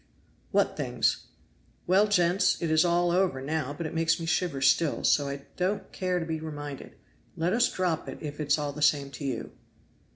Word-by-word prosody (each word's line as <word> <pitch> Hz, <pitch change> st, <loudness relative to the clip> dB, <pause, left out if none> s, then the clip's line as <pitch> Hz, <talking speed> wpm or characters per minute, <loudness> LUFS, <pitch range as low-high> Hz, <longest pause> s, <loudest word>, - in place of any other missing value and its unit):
"What -, -, +1 dB
things?" -, -, -1 dB, 0.6 s
"Well, 195 Hz, +4 st, +4 dB
gents, 180 Hz, -2 st, +2 dB
it 165 Hz, -2 st, -1 dB
is 160 Hz, 0 st, +5 dB
all 175 Hz, 0 st, +2 dB
over 180 Hz, -6 st, +1 dB
now, 145 Hz, 0 st, -2 dB
but 155 Hz, +3 st, -5 dB
it 155 Hz, -, -4 dB
makes 165 Hz, 0 st, +1 dB
me 165 Hz, -, -4 dB
shiver 165 Hz, -4 st, 0 dB
still, 135 Hz, +4 st, +2 dB
so 145 Hz, -1 st, +3 dB
I 140 Hz, 0 st, -6 dB
don't 190 Hz, +1 st, -1 dB
care 185 Hz, -1 st, -1 dB
to 165 Hz, -, -3 dB
be 160 Hz, -1 st, -3 dB
reminded; 145 Hz, -3 st, -7 dB, 0.4 s
let 170 Hz, +3 st, 0 dB
us 240 Hz, +2 st, +3 dB
drop 180 Hz, -4 st, -1 dB
it -, -, -7 dB
if 150 Hz, -1 st, -7 dB
it 150 Hz, -, -3 dB
is 145 Hz, -, +3 dB
all 145 Hz, -1 st, -3 dB
the 150 Hz, -, -8 dB
same 140 Hz, -2 st, +2 dB
to 140 Hz, -, -8 dB
you." 130 Hz, -5 st, -3 dB
160 Hz, 200 wpm, -28 LUFS, 145-175 Hz, 0.6 s, is